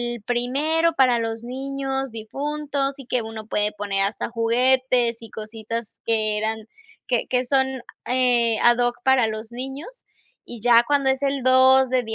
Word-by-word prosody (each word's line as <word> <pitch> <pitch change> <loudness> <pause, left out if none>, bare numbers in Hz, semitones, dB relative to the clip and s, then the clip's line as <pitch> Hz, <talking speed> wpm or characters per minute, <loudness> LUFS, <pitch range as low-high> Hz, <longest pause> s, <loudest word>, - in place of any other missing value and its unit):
el 230 - -12
primero 285 +8 0
para 250 -4 +3
los 225 0 -4
niños 270 +1 -4
difuntos, 280 +5 -3
y 275 - -11
que 250 0 -1
uno 220 -1 -8
puede 210 -1 0
poner 200 -1 -2
hasta 200 +2 -3
juguetes 245 +1 +2
y 225 - -11
cositas 220 +1 -7
que 215 -2 +1
eran 220 0 -3 0.4
que 245 -2 0
que 250 0 0
son, 265 +1 +2 0.4
eh, 245 -3 +2
a 240 - +7
doc, 245 0 0
para 265 -3 +3
los 220 +1 -6
niños 270 - -8 0.4
y 240 - -9
ya 235 0 +5
cuando 280 -2 +2
es 265 +1 -3
el 275 -1 -1
2, 260 +1 +6
de 255 -1 +2
245 Hz, 165 wpm, -22 LUFS, 225-265 Hz, 0.4 s, a